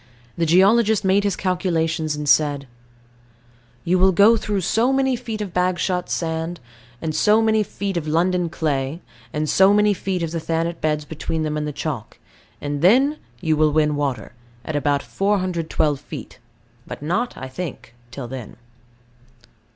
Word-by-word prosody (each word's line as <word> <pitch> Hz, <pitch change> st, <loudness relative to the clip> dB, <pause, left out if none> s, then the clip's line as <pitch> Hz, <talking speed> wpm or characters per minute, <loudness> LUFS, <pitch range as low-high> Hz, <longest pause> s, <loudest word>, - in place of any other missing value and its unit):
The 165 Hz, -1 st, 0 dB
geologist 210 Hz, +4 st, +4 dB
made 195 Hz, +2 st, +3 dB
his 200 Hz, -2 st, 0 dB
calculations, 165 Hz, -4 st, -1 dB
and 150 Hz, 0 st, -5 dB
said: 145 Hz, -1 st, +3 dB, 1.2 s
"You 180 Hz, +2 st, +2 dB
will 190 Hz, +1 st, +5 dB
go 200 Hz, +6 st, +6 dB
through 210 Hz, -3 st, -2 dB
so 225 Hz, +8 st, +2 dB
many 265 Hz, -1 st, +2 dB
feet 230 Hz, -3 st, -5 dB
of 195 Hz, -4 st, -5 dB
Bagshot 180 Hz, 0 st, 0 dB
sand; 165 Hz, 0 st, -2 dB, 0.4 s
and 160 Hz, -1 st, -2 dB
so 210 Hz, +6 st, +4 dB
many 220 Hz, -1 st, +3 dB
feet 200 Hz, -2 st, -3 dB
of 155 Hz, -2 st, -3 dB
London 175 Hz, +2 st, +1 dB
clay; 150 Hz, -1 st, -2 dB, 0.3 s
and 150 Hz, +1 st, -2 dB
so 190 Hz, +5 st, +5 dB
many 210 Hz, 0 st, +4 dB
feet 185 Hz, -2 st, -3 dB
of 165 Hz, -, -3 dB
the 165 Hz, -, -2 dB
Thanet 165 Hz, +1 st, -2 dB
beds 150 Hz, -1 st, 0 dB
between 160 Hz, +1 st, -3 dB
them 155 Hz, -1 st, -2 dB
and 150 Hz, 0 st, -2 dB
the -, -, -3 dB
chalk: 140 Hz, -6 st, -5 dB, 0.4 s
and 145 Hz, 0 st, -3 dB
then 265 Hz, -, +4 dB, 0.2 s
you 160 Hz, -3 st, +1 dB
will 155 Hz, 0 st, +3 dB
win 150 Hz, 0 st, +2 dB
water, 135 Hz, -7 st, -3 dB, 0.3 s
at 155 Hz, -, -4 dB
about 145 Hz, -1 st, +1 dB
412 180 Hz, -7 st, 0 dB
feet; -, -, -9 dB, 0.5 s
but -, -, -8 dB
not, 220 Hz, +11 st, -1 dB
I 130 Hz, -, -6 dB
think, 130 Hz, -4 st, -7 dB, 0.2 s
till 125 Hz, 0 st, -7 dB
then." 125 Hz, -3 st, -8 dB
170 Hz, 160 wpm, -21 LUFS, 150-195 Hz, 1.2 s, go